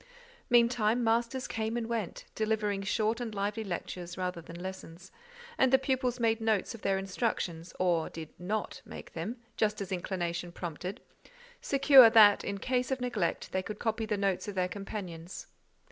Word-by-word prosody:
Meantime, 235 -1 +3
masters 235 +3 +1
came 225 +1 -2
and 235 - -2
went, 225 -5 -3
delivering 215 -2 0
short 220 +4 0
and 225 -3 -4
lively 205 +2 -1
lectures, 180 -1 -5
rather 180 -2 -3
than 165 +1 -10
lessons, 185 -1 -8 0.5
and 260 - +4
the 265 - +7
pupils 260 -2 -1
made 225 -1 +2
notes 220 0 +1
of 230 - -10
their 195 -1 +1
instructions, 185 -4 -2
or 175 -3 +1
did 160 -2 -8
not 205 +5 -3
make - - -10
them—just 225 -2 -3
as 200 -1 -5
inclination 175 -2 -3
prompted; 175 +2 -6 0.6
secure 275 -3 +8
that, 215 -3 +7
in 200 - -3
case 250 +4 0
of 265 -1 -1
neglect, 240 -8 -2
they 190 - 0
could 210 +2 -6
copy 225 0 -1
the 210 -1 0
notes 195 -1 0
of 205 - -5
their 180 -1 +1
companions. 185 -3 -7
210 Hz, 160 wpm, -31 LUFS, 185-230 Hz, 0.6 s, secure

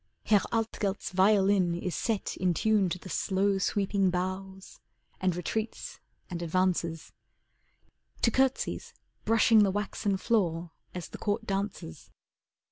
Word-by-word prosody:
Herr 210 -2 +4
Altgelt's 215 -4 -2
violin 190 -2 +3
is 175 0 -3
set 220 -4 -2
In 180 -2 +1
tune 210 -2 +2
to 175 - -2
the 185 - -12
slow, 195 +1 +1
sweeping 195 0 +1
bows, 185 +1 -4 0.4
and 185 -2 +1
retreats 215 +5 -4 0.3
and 175 -2 -5
advances, 170 -1 0 1.1
To 230 - +4
curtsies 265 +2 0 0.3
brushing 225 -1 +5
the 200 - +4
waxen 205 0 -1
floor 175 -6 0 0.2
as 180 -3 -5
the - - -9
Court 220 +2 -1
dances. 195 - -4
195 Hz, 125 wpm, -29 LUFS, 180-210 Hz, 1.1 s, brushing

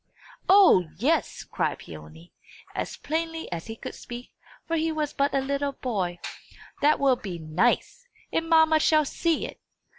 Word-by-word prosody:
"O, 380 - +7
yes!" 290 - 0
cried - - -2
Peony, 80 +2 -12 0.4
as - - -4
plainly 325 +1 -3
as 170 +2 -5
he 225 - -6
could - - -7
speak, 240 +1 -9 0.3
for 330 - -1
he 320 0 0
was 305 -2 -2
but 280 0 +1
a 275 - +2
little 280 +1 -1
boy. 195 -10 -2 0.6
"That 300 +1 +4
will 275 -2 +4
be 190 -6 -6
nice! 185 - 0 0.3
And 325 0 0
mamma 320 -1 +5
shall 310 0 +4
see 330 +3 0
it!" - - -9
280 Hz, 155 wpm, -26 LUFS, 200-320 Hz, 0.6 s, O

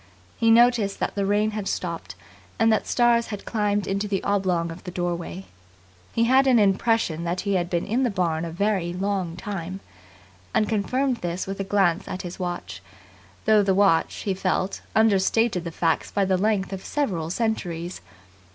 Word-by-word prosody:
He 230 - +2
noticed 230 -3 +4
that - - -1
the 200 -1 -1
rain 210 +2 +2
had 210 -2 -4
stopped, 170 - -4 0.4
and 225 0 +4
that 215 - 0
stars 240 -1 +3
had 205 -2 -7
climbed 205 -2 0
into 200 +2 -1
the 200 -2 -2
oblong 185 -4 0
of 165 - -10
the 185 - -6
doorway. 175 +1 -4 0.7
He 230 - +1
had 260 +3 +4
an 255 -2 +5
impression 200 -4 +2
that 175 +2 -2
he 200 0 -1
had 175 -2 0
been 175 -1 -1
in 230 +5 0
the 255 - +2
barn 170 -5 -1
a 170 - -3
very 180 0 -1
long 185 -2 -2
time; 190 -1 -5 0.8
and 215 - +3
confirmed 250 +5 0
this 175 -2 -3
with 195 +1 -5
a - - 0
glance 195 -2 +1
at 185 - -5
his 175 +1 -7
watch, 175 - -5 0.6
though 215 -1 +5
the 195 -1 +2
watch, 195 -5 +3
he 195 - 0
felt, 185 0 -1
understated 220 -2 +2
the 170 - -4
facts 165 0 0
by 200 - +1
the 190 0 +2
length 195 0 0
of 190 - -6
several 185 - -2
centuries. 175 -5 -2
195 Hz, 180 wpm, -24 LUFS, 175-215 Hz, 0.8 s, an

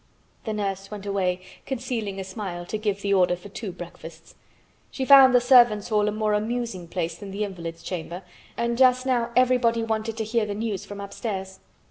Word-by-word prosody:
The 220 - -2
nurse 195 -2 -3
went 205 -1 -8
away, 185 -2 0 0.3
concealing 235 -6 -3
a - - -3
smile, 190 -3 -6
to 215 - -3
give 205 -2 -2
the 200 0 +1
order 180 -2 +3
for 180 +3 -12
two 200 0 -6
breakfasts. 170 -2 -11 0.6
She 265 - -3
found 265 -2 +8
the - - +8
servants' 240 -4 +5
hall 210 -1 +2
a - - +1
more 215 0 0
amusing 215 -4 -2
place 170 -1 -3
than 200 +3 -9
the 200 +2 -3
invalid's 170 -4 -6
chamber 175 +1 -5 0.3
and 235 +1 -1
just 255 0 +5
now 240 -3 +1
everybody 245 -2 +3
wanted 225 0 -2
to 220 - -1
hear 220 0 0
the 205 - -3
news 215 -3 -3
from 205 0 -8
upstairs. 200 -1 -5
210 Hz, 190 wpm, -25 LUFS, 190-235 Hz, 0.6 s, found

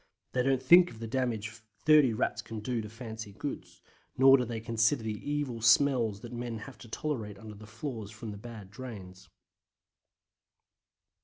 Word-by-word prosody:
They 125 - +1
don't 130 0 +1
think 175 +6 +7
of 115 - -12
the 115 - -6
damage 115 -3 -1 0.4
30 150 -5 +6
Rats 110 - -1
can 110 -1 -7
do 115 +2 -2
to 105 - -7
fancy 110 -2 -8
goods, 90 -8 -7 0.3
nor 135 +1 +8
do 125 -2 +1
they 115 -1 -4
consider 115 +2 +1
the 110 - -2 0.2
evil 140 -6 -2
smells 115 -3 +4
that 120 0 -9
men 120 -1 -4
have 130 +5 -10
to 120 - -12
tolerate 110 -7 -3
under 110 +1 -10
the 105 +1 -12
floors 110 -2 -6
or - - -13
from 110 0 -7
the 100 - -8
bad 105 -4 -10
drains. 105 -6 -9
115 Hz, 175 wpm, -30 LUFS, 110-130 Hz, 0.4 s, nor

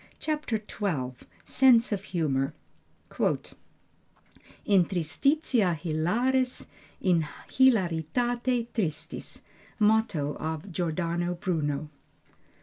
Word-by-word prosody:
CHAPTER 300 -7 -1
XII 175 -11 -3 0.3
SENSE 250 -4 +4
OF 200 -2 -1
HUMOR 150 -6 0 2.1
In 195 -4 +5
tristitia 195 - +1
hilaris, 235 - 0 0.4
in 170 -5 +2 0.2
hilaritate 240 - +2
tristis. 165 -10 -4 0.4
MOTTO 210 -10 +2
OF 160 +4 -4
GIORDANO 175 +1 -1
BRUNO. 155 -4 -2
180 Hz, 70 wpm, -28 LUFS, 160-235 Hz, 2.1 s, In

